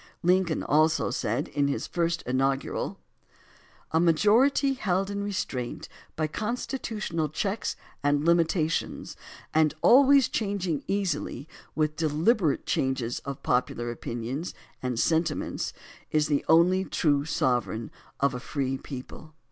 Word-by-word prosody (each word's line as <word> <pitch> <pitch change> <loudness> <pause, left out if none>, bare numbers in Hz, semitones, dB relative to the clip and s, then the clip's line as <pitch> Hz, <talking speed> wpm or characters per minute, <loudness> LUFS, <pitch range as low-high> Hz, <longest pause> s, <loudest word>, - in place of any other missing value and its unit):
Lincoln 180 -2 +2
also 155 +2 +2
said, 115 -1 -1
in 145 -1 +1
his 140 - -2
first 170 -1 -1
inaugural: 135 +2 -1 0.9
A 160 - +3
majority 220 - +4
held 195 -5 -1
in 200 0 -3
restraint 130 -11 -3 0.3
by 155 - 0
constitutional 210 - -3
checks 195 +7 -2 0.3
and 145 +1 +2
limitations, 165 -1 +1 0.4
and 155 -1 +3
always 275 0 +7
changing 195 -7 -2
easily 170 -8 -2 0.3
with 155 0 0
deliberate 160 - +1
changes 130 -3 -1
of 140 -1 -6
popular 120 -1 0
opinions 120 +7 -5 0.3
and 125 -2 -2
sentiments, 160 +1 0 0.4
is 155 -1 +2
the 145 -2 0
only 180 +3 +5
trlife 145 -5 +1
sovereign 120 -6 0 0.3
of 140 -1 +2
a 125 - -4
free 135 0 -2
people. 145 +3 -9
155 Hz, 115 wpm, -27 LUFS, 140-190 Hz, 0.9 s, always